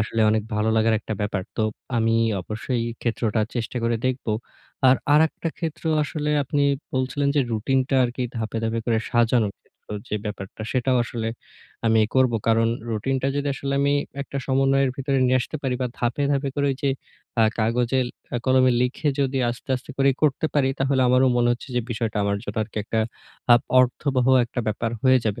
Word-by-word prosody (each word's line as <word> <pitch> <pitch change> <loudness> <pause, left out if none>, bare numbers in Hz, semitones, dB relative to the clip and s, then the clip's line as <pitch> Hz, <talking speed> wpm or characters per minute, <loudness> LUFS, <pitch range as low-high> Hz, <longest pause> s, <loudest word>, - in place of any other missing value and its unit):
আসলে 110 +2 -1
অনেক 110 -1 +1
ভালো 105 +1 +1
লাগার 110 0 +3
একটা 110 - -4
ব্যাপার। 105 -2 -1
তো 110 - +1 0.3
আমি 115 0 +2 0.3
অবশ্যই 110 +5 -3
এই - - -8
ক্ষেত্রটা 115 -2 0 0.2
চেষ্টা 115 +1 -3
করে 115 0 +1
দেখবো। 125 -3 -1 0.6
আর 130 - +6 0.2
আরেকটা 160 +2 +2
ক্ষেত্র 165 -2 -5 0.2
আসলে 150 0 -3
আপনি 145 +2 0 0.3
বলছিলেন 130 +2 0
যে - - +5
রুটিনটা 130 +5 0
আরকি 125 +1 -3
ধাপে, 115 0 -3
ধাপে 115 0 -1
করে 115 -1 +2
সাজানোর 115 -3 +2
ক্ষেত্র - - -35 0.4
যে 105 - -1
ব্যাপারটা 105 0 -6
সেটাও 130 0 +2
আসলে 115 -1 -3 0.6
আমি 110 0 +4
করবো। 130 -3 +3
কারণ 115 0 +3 0.2
রুটিনটা 130 +5 -1
যদি 145 - -1
আসলে 140 0 -3
আমি 140 0 +2 0.3
একটা 140 - -8
সমন্বয়ের 135 0 +2
ভিতরে 135 -1 0
নিয়ে 130 +1 +3
আসতে 140 +5 -4
পারি 130 -2 0
বা 125 - +1
ধাপে, 120 +4 -1
ধাপে 140 0 0
করে 145 -1 +1
ওই 135 - -2
যে 140 - +2 0.5
আ - - +6 0.2
কাগজে 120 +3 +1 0.5
কলমে 130 -1 +4
লিখে 125 +5 0
যদি 135 -1 0
আস্তে, 120 +3 -9
আস্তে 130 +4 -10
করে 135 0 +5
করতে 150 +1 +2
পারি, 135 -2 +3
তাহলে 135 0 +2
আমারও 130 +1 +4
মনে 120 0 +3
হচ্ছে 120 +3 -7
যে 125 - +3
বিষয়টা 115 -1 -2
আমার 100 0 +1
জন্য - - -7
আর 110 - -7 0.2
একটা 110 +1 -1 0.5
আ - - +10 0.3
অর্থবহ 130 0 +1 0.2
একটা 120 +1 -4
ব্যাপার 110 +1 -1
হয়ে 130 -1 +5
যাবে। 105 -2 -1
125 Hz, 180 wpm, -23 LUFS, 115-135 Hz, 0.6 s, আ